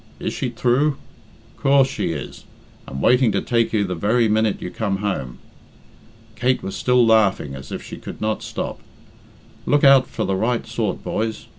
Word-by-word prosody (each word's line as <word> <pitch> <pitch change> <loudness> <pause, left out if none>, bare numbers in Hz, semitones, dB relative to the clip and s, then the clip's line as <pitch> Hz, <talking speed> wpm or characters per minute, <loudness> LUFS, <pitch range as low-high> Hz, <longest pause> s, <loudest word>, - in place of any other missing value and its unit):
'Is - - -3
she 125 - -2
thrue?' 130 +5 +1 0.6
Coorse 135 -1 +4
she - - -3
is, 75 -5 -7 0.4
and 70 0 -5
waiting 125 -2 +4
to - - +1
take 115 -2 0
you 105 -2 +1
the 90 -2 -3
very 110 +7 +2
minute 110 -1 +1
you 90 - -6
come 100 -4 -2
home." 95 -12 -3 1.0
Kate 125 +3 0
was 95 - -5
still 125 -1 +3
laughing 105 -10 +3
as 65 0 -9
if - - -5
she - - -9
could - - -9
not 110 0 -1
stop. - - -5 0.9
"Look 145 0 +3
out 135 -2 +7
for - - -3
the 95 - 0
right 115 +5 0
sort, 115 -3 -3
boys. 110 0 -3
110 Hz, 175 wpm, -21 LUFS, 100-125 Hz, 1.0 s, out